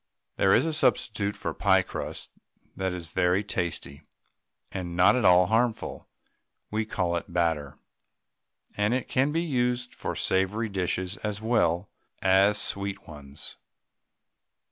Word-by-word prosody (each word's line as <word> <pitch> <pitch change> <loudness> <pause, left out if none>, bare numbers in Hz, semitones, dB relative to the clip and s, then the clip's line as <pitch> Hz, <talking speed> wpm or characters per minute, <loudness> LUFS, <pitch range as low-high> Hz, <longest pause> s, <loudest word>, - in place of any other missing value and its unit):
There 95 - +4
is - - +3
a 165 - -1
substitute 105 -8 +1
for - - -3
pie - - +3
crusts - - -6 0.4
that 95 -1 -1
is 85 -2 -7
very 95 +2 +2
tasty, 85 -8 -4 0.7
and 90 -3 -5
not 90 +7 +5
at 125 - +1
all 90 0 +6
harmful. 115 +3 -1 0.6
We 110 +1 0
call 85 -4 -1
it 85 - -7
"batter," 80 -5 0 1.0
and 105 +4 +1
it 130 - -2
can 135 +3 +1
be 165 +2 0
used 125 -5 -1
for - - -4
savoury 100 +4 +1
dishes 95 0 -2
as 105 -1 -4
well 105 -5 +1 0.4
as 95 +2 +4
sweet 100 -1 -3
ones. 70 -2 -8
95 Hz, 135 wpm, -27 LUFS, 90-110 Hz, 1.0 s, all